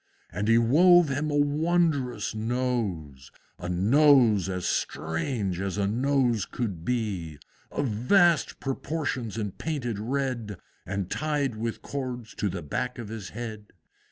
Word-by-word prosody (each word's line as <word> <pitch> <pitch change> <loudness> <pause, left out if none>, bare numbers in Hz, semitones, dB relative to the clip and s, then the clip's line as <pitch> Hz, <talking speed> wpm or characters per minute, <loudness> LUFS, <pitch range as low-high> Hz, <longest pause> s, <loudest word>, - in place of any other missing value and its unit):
And 100 +1 -2
he 115 0 +5
wove 165 +8 +6
him 145 +3 -1
a 145 - -1
wondrous 145 -3 +1
Nose, 110 - -2 0.3
A 90 - -5
Nose 110 - +4
as 90 -1 -3
strange 90 - -2
as 95 0 -3
a 100 - +1
Nose 120 -1 +1
could 100 -9 -4
be! 95 -10 -2 0.3
Of 145 - -1
vast 160 - +3
proportions 135 -4 -3
and 105 -4 -3
painted 125 -9 -3
red, 120 -4 -2 0.3
And 100 -1 -3
tied 145 -5 -1
with 115 +1 -4
cords 125 -4 -5
to 105 - 0
the 90 -2 -5
back 125 - -3
of 115 -4 -7
his 110 -4 -6
head. 110 -2 -7
115 Hz, 135 wpm, -27 LUFS, 100-140 Hz, 0.3 s, wove